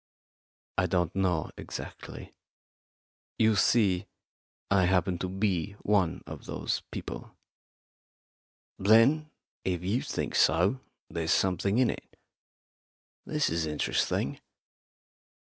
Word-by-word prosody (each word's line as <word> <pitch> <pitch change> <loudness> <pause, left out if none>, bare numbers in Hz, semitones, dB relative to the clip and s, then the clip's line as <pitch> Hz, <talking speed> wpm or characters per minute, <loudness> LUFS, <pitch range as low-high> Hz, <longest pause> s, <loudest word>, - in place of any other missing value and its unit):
"I 90 - +2
don't 90 -3 0
know 90 -5 0
exactly. - - -8 1.0
You 110 -1 +4
see, 100 -3 +3 0.6
I 95 -2 +5
happen 90 -1 +1
to 95 - -2
be 95 -1 -1
one 100 -5 +1
of - - -9
those - - -2
people." - - -7 1.4
"Then, 115 +10 +5 0.3
if 90 -2 -1
you 105 +7 0
think - - -3
so, 95 +11 +3 0.3
there's 80 -1 -3
something 95 +3 +2
in 125 -1 +4
it. - - -11 1.1
This 150 -1 +1
is 80 -1 0
interesting. 75 -1 -1
95 Hz, 100 wpm, -29 LUFS, 90-105 Hz, 1.4 s, I